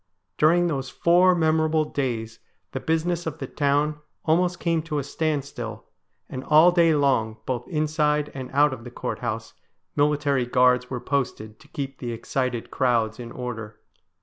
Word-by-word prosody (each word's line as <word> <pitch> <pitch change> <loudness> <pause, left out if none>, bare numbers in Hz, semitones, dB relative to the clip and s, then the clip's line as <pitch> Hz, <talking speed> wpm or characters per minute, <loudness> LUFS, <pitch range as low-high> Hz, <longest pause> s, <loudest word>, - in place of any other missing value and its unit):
During 170 +3 +5
those 135 -6 -2
four 180 +4 +4
memorable 160 -1 +2
days 115 -6 -3 0.3
the - - -3
business 165 +1 -1
of 160 -1 -4
the 140 - -5
town 145 +2 0 0.3
almost 175 +2 +2
came 165 -2 +1
to 155 -1 -4
a 145 - -1
standstill, 140 -7 -3 0.4
and 130 0 -6
all 155 +5 +6
day 170 -2 +4
long 130 -6 +1
both 120 -2 -3
inside 150 -2 0
and 130 -2 -6
out 145 0 +4
of 120 -3 -8
the 125 - -8
Courthouse 115 -2 -4 0.4
military 145 -3 +2
guards 125 0 +3
were 125 - -3
posted 120 -5 -3
to - - -18
keep 135 -1 -6
the 120 -2 -4
excited 125 0 -3
crowds 120 -3 +1
in 120 -1 -7
order. 115 -4 -6
140 Hz, 155 wpm, -25 LUFS, 125-155 Hz, 0.4 s, all